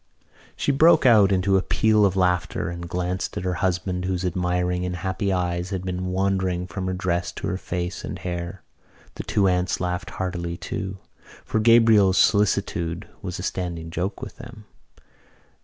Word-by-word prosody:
She - - 0
broke 155 +1 +5
out 105 -5 +6
into 95 +1 +3
a - - +2
peal 110 +1 +3
of 95 - -3
laughter 90 -2 0
and 85 0 -7
glanced 90 +3 -2
at 100 - -3
her 90 -1 0
husband, 90 0 -1
whose 95 -1 -1
admiring 90 0 0
and 90 0 -2
happy 95 +3 -2
eyes 90 -1 -1
had 95 -2 -4
been 90 0 -3
wandering 95 -1 0
from 95 +2 -5
her 95 - -1
dress 90 -2 -1
to - - -6
her 95 - -1
face 90 0 -4
and - - -5
hair. 90 +1 -5 0.5
The - - -6
two 100 -2 +2
aunts 90 0 +1
laughed 90 -1 -2
heartily 85 -2 -4
too, 95 +2 -5 0.5
for 110 - 0
Gabriel's 110 -4 +5
solicitude 95 -5 +1
was 95 -2 -5
a 90 - -6
standing 85 -3 -4
joke 95 +5 -3
with - - -8
them. 120 -3 -11
90 Hz, 170 wpm, -24 LUFS, 90-95 Hz, 0.5 s, out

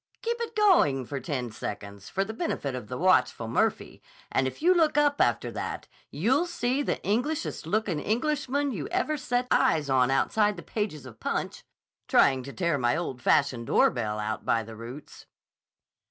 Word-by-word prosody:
Keep 470 +1 -1
it 460 -1 -4
going 345 - +4
for 140 +2 -4
ten 125 -3 -3
seconds 100 -2 -7
for 195 +1 -1
the 220 - -6
benefit 220 - -3
of 125 -5 -6
the 125 - -5
watchful 180 -10 +2
Murphy, 115 - -1 0.3
and 130 - +1
if 130 - -6
you 355 +4 +5
look 320 -4 +2
up 290 -1 +3
after - - +1
that, - - -5 0.2
you'll 255 - +1
see 270 -5 -1
the - - -1
Englishest 245 - -1
looking 200 -4 0
Englishman 280 - 0
you 170 - -4
ever 305 - 0
sat 250 -3 -1
eyes 150 -3 +3
on 130 -1 +4
outside 205 +9 +2
the 170 - -8
pages 200 - -4
of 120 -4 -12
Punch, - - -3 0.4
trying 135 -1 +4
to 135 +2 -8
tear 170 -3 0
my 120 +4 +2
old 135 -7 -4
fashioned 120 -3 +2
doorbell 105 -3 +2
out 105 +1 -3
by 115 -1 +1
the 110 +1 -10
roots." 120 +6 -10
165 Hz, 175 wpm, -27 LUFS, -, 0.4 s, you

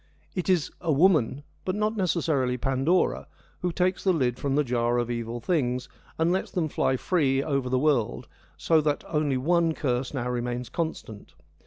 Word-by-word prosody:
It 180 0 -3
is 175 -5 +2
'a 170 -3 0
woman,' 145 -4 +3 0.2
but 185 - -2
not 215 +1 0
necessarily 155 -9 0
Pandora, 135 +8 +1 0.3
who 180 - 0
takes 180 +2 0
the 190 - +4
lid 130 -8 0
from 140 -1 -1
the 150 - +3
Jar 120 -2 0
of 120 0 -1
Evil 115 0 -3
Things 125 -3 -1 0.3
and 165 +2 +2
lets 190 - -1
them 165 -4 -1
fly 130 -2 +1
free 135 -5 +1
over 140 -4 -1
the 130 - +2
world, 125 -4 +1 0.3
so 160 -2 +3
that 150 -1 0
only 150 -4 0
one 165 +4 +2
curse 125 -2 -1
now 125 -4 -3
remains 125 0 -3
constant. 160 -11 -5
140 Hz, 175 wpm, -26 LUFS, 125-170 Hz, 0.3 s, the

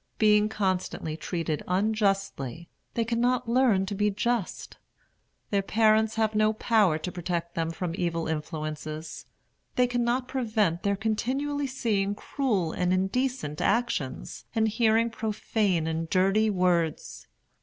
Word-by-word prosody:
Being 210 -1 +4
constantly 185 -6 -2
treated 160 -1 -3
unjustly, 195 - 0 0.3
they 230 - +1
cannot 240 +1 +1
learn 235 -5 +3
to 200 - -4
be 210 +1 +1
just. 210 0 -2 0.7
Their 200 -1 +2
parents 220 +1 +3
have 220 -1 +1
no 215 0 +3
power 215 -7 +3
to 180 +3 -5
protect 170 -1 -3
them 165 -1 -1
from 165 +1 -3
evil 170 -2 -1
influences. 155 0 -5 0.5
They 250 - +4
cannot 245 +1 0
prevent 215 -10 0
their 200 0 +1
continually 265 +7 -1
seeing 210 -6 0
cruel 210 - -1
and 180 +1 0
indecent 190 - -1
actions, 200 - -1
and 220 0 +3
hearing 225 +1 +2
profane 210 -5 0
and 160 0 -2
dirty 195 +4 +3
words. 180 -5 0
205 Hz, 125 wpm, -27 LUFS, 170-225 Hz, 0.7 s, Being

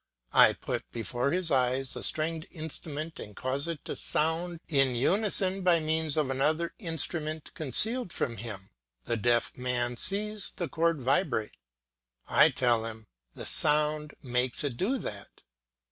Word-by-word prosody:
I - - +7
put - - -5
before 120 +3 -2
his 175 +2 0
eyes 130 0 +1
a - - -5
stringed 160 +2 -1
instrument 155 -1 -6
and 105 - -9
cause 135 +4 -2
it 165 -3 -5
to - - -4
sound 165 +2 -1
in 135 -5 +2
unison 195 - +2
by 175 -2 +4
means 160 -1 -1
of 145 -4 +1
another 155 +5 0
instrument 160 -4 -2
concealed 220 - +2
from 115 -6 -2
him; 105 -5 -8 0.3
the 120 - -1
deaf 120 +1 +1
man 125 -1 -1
sees 210 - +1
the 175 - -3
chord 165 0 0
vibrate. 130 - 0 0.7
I - - +6
tell 120 -3 +1
him, 110 -1 -9 0.3
"The - - -6
sound 150 0 +2
makes 125 +1 0
it 140 -4 -2
do 220 - 0
that." 100 - -8
150 Hz, 145 wpm, -29 LUFS, 125-165 Hz, 0.7 s, I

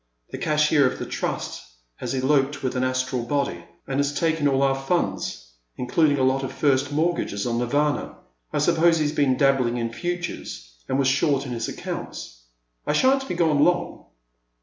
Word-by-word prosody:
The - - -6
cashier 150 -2 +3
of - - -7
the - - -5
Trust - - -4 0.4
has - - -4
eloped 135 +2 +1
with 130 - -1
an 125 - 0
Astral 130 -1 -1
body, 140 +4 -2 0.2
and 135 0 -2
has 145 0 0
taken 160 -3 +1
all 135 -1 +2
our 135 -1 +3
fiinds, 95 - -2 0.3
including 145 +3 +2
a 130 - +1
lot 130 +1 +2
of 135 - -3
first 140 -1 +1
mortgages 155 -10 0
on 120 -1 0
Nirvana. 145 +4 0 0.3
I - - -2
suppose 165 +1 +3
he 155 - +1
's 145 - 0
been 140 -4 +2
dabbling 130 -3 +2
in 115 -1 -3
futures, 175 - -5 0.2
and 130 - +1
was 135 -1 +2
short 140 +1 +2
in 130 - -6
his 115 -2 -3
accounts. - - -7 0.4
I - - +2
shan't 270 +1 +3
be 180 - -3
gone 160 -4 +3
long." 175 - 0
140 Hz, 180 wpm, -24 LUFS, 130-150 Hz, 0.4 s, cashier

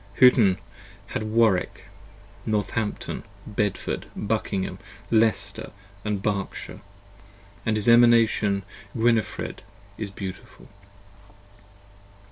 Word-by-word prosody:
Huttn 115 -7 +6 0.6
had - - -1
Warwick, 110 -3 +2 0.6
Northampton, 105 0 -2 0.2
Bedford, 105 -2 -2
Buckingham, 105 -2 -2 0.3
Leicester 110 -2 +1 0.3
& 100 - -25
Berkshire; 100 -1 -3 0.5
& 100 0 -25
his 110 -1 0
Emanation 115 -4 +5 0.3
is - - -4
Gwinefred 115 -3 +1 0.6
beautiful. 95 -2 -8
105 Hz, 75 wpm, -25 LUFS, 100-115 Hz, 0.6 s, Huttn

